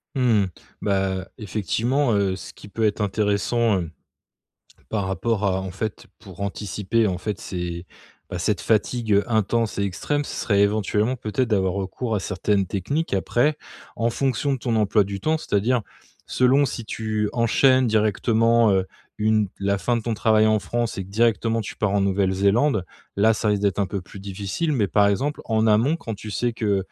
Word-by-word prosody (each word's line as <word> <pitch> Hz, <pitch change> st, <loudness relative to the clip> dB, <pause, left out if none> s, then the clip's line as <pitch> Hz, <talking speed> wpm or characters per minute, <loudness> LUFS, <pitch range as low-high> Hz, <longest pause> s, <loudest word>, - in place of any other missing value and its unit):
Mmh, 120 Hz, -6 st, +3 dB, 0.4 s
bah, 95 Hz, -1 st, +1 dB
heu, 95 Hz, -, -7 dB
effectivement, 115 Hz, +6 st, 0 dB
heu, 100 Hz, -2 st, +1 dB
ce 95 Hz, -, -10 dB
qui -, -, -13 dB
peut 110 Hz, +2 st, -1 dB
être 105 Hz, 0 st, 0 dB
intéressant, 105 Hz, +1 st, +1 dB
heu, 85 Hz, -, -6 dB, 1.0 s
par 100 Hz, -3 st, -1 dB
rapport 105 Hz, +2 st, -1 dB
à 95 Hz, -1 st, +1 dB
en 95 Hz, 0 st, -5 dB
fait 100 Hz, +3 st, -5 dB
pour 95 Hz, -1 st, -13 dB
anticiper, 105 Hz, +2 st, -1 dB
en 90 Hz, -2 st, -1 dB
fait, 105 Hz, +1 st, -4 dB
ces, 90 Hz, -1 st, -5 dB, 0.4 s
bah, 90 Hz, -, -4 dB
cette 95 Hz, +1 st, 0 dB
fatigue, 110 Hz, 0 st, 0 dB
heu, 100 Hz, +1 st, +3 dB
intense 110 Hz, 0 st, +1 dB
et -, -, +1 dB
extrême 145 Hz, +10 st, -2 dB
ce -, -, -6 dB
serait 100 Hz, -4 st, +1 dB
éventuellement, 105 Hz, +3 st, +1 dB
peut-être, 120 Hz, +1 st, -1 dB
d'avoir 95 Hz, -4 st, +1 dB
recours 100 Hz, +4 st, -3 dB
à 105 Hz, -, 0 dB
certaines 95 Hz, +1 st, 0 dB
techniques. 120 Hz, -, -2 dB
Après, 120 Hz, +10 st, +1 dB, 0.4 s
en 115 Hz, +1 st, +1 dB
fonction 135 Hz, +2 st, 0 dB
de 135 Hz, -, -1 dB
ton 120 Hz, -1 st, -1 dB
emploi 105 Hz, -1 st, +3 dB
du 100 Hz, 0 st, -5 dB
temps, 155 Hz, +9 st, +1 dB
c'est-à-dire, 115 Hz, -1 st, 0 dB, 0.4 s
selon 130 Hz, +3 st, +3 dB
si 120 Hz, -3 st, -4 dB
tu 110 Hz, -1 st, -2 dB
enchaînes 130 Hz, +2 st, +3 dB
directement, 110 Hz, +1 st, +3 dB
heu, 95 Hz, -1 st, +1 dB, 0.3 s
une 110 Hz, -1 st, +2 dB
la 100 Hz, 0 st, +1 dB
fin 120 Hz, +7 st, 0 dB
de 115 Hz, -, -3 dB
ton 115 Hz, +1 st, -2 dB
travail 110 Hz, 0 st, +3 dB
en 110 Hz, 0 st, +3 dB
France 120 Hz, +1 st, -2 dB
et 95 Hz, -, -3 dB
que -, -, -15 dB
directement 115 Hz, +1 st, +1 dB
tu 105 Hz, -, -7 dB
pars 105 Hz, -2 st, 0 dB
en 100 Hz, -, +3 dB
Nouvelle-Zélande, 100 Hz, +4 st, +2 dB, 0.3 s
là 110 Hz, +3 st, +4 dB
ça 110 Hz, -, -2 dB
risque 105 Hz, -1 st, +1 dB
d'être 100 Hz, -1 st, +1 dB
un 100 Hz, -, +2 dB
peu 100 Hz, +1 st, -4 dB
plus 95 Hz, +2 st, -12 dB
difficile. 100 Hz, -, -3 dB
Mais, 110 Hz, -8 st, +1 dB
par 100 Hz, +4 st, +4 dB
exemple, 135 Hz, +9 st, 0 dB
en 110 Hz, -1 st, +1 dB
amont, 115 Hz, +9 st, +3 dB
quand 115 Hz, -9 st, -6 dB
tu 105 Hz, +1 st, -8 dB
sais 120 Hz, +3 st, 0 dB
que 105 Hz, -3 st, 0 dB
105 Hz, 185 wpm, -23 LUFS, 100-115 Hz, 1.0 s, là